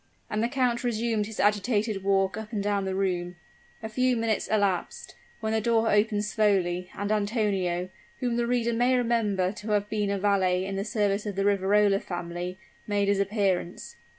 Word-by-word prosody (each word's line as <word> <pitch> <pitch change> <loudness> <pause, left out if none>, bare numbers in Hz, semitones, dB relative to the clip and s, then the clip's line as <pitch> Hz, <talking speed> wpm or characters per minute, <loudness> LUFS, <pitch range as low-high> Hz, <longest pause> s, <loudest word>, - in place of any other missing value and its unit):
And 215 - 0
the 230 - +2
count 250 -2 0
resumed 225 -3 0
his 220 - -9
agitated 210 0 +1
walk 195 -1 +2
up 220 0 -7
and 205 -3 -2
down 200 -1 0
the 190 0 -2
room. 180 -2 -1 0.5
A - - -2
few 255 +2 +1
minutes 225 -2 0
elapsed, 200 -4 -1 0.3
when 220 0 -1
the 220 - +1
door 225 0 +2
opened 210 0 +2
slowly, 185 -5 +1
and 205 +1 -2
Antonio, 200 -4 0 0.3
whom 245 -2 -1
the 235 0 0
reader 235 -1 +1
may 245 +2 +3
remember 220 -6 +1
to 210 +1 -8
have 205 0 0
been 210 -2 0
a 200 - 0
valet 190 -2 +2
in 195 0 -4
the 195 - -1
service 205 -1 0
of 205 - -4
the 195 0 0
Riverola 200 0 +3
family, 175 +1 -5 0.3
made 205 -1 +1
his 200 -1 +2
appearance. 195 -3 -1
205 Hz, 180 wpm, -27 LUFS, 195-220 Hz, 0.5 s, may